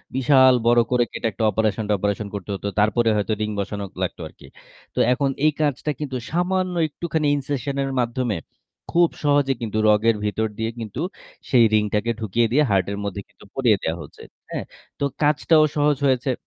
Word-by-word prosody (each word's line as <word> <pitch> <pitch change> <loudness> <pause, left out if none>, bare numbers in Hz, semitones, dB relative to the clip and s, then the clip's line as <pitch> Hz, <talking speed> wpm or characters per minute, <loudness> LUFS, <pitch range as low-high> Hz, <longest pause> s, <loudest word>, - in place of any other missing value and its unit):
বিশাল 130 0 +5
বড় 120 0 +5
করে 125 -1 +3
কেটে - - -2
একটা 110 - -4
অপারেশন-টপারেশন 105 -1 -1
করতে 100 0 -7
হতো। 100 - -5
তারপরে 115 +2 +3
হয়তো 105 +1 0
রিং 105 - -1
বসানো 100 0 -3 0.2
লাগতো - - -4
আরকি। - - -16 0.5
তো - - -1
এখন 140 +2 0 0.2
এই 155 - +5
কাজটা 150 0 0
কিন্তু 135 -4 -3
সামান্য 180 +2 0
একটুখানি 160 0 -3
incession 140 -1 -3
এর 135 - -3
মাধ্যমে 120 -2 -1 0.6
খুব 170 -1 +4
সহজে 145 -2 +3
কিন্তু 110 -2 -3
রগের 110 +2 +4
ভিতর 105 +2 0
দিয়ে 110 0 -2
কিন্তু 110 +2 -5 0.5
সেই 120 -3 +6
রিংটাকে 105 +2 +1
ঢুকিয়ে 115 +2 +1
দিয়ে 150 +5 +4
হার্টের 100 +1 +1
মধ্যে 100 0 -4
কিন্তু - - -19
পরিয়ে 120 -6 +3
দেয়া 80 - -1
হচ্ছে, 70 - -12 0.3
হ্যাঁ? - - -4 0.3
তো - - -2 0.2
কাজটাও 150 +1 +4
সহজ 145 -1 +3
হয়েছে। 130 0 +1
120 Hz, 170 wpm, -22 LUFS, 105-145 Hz, 0.6 s, সেই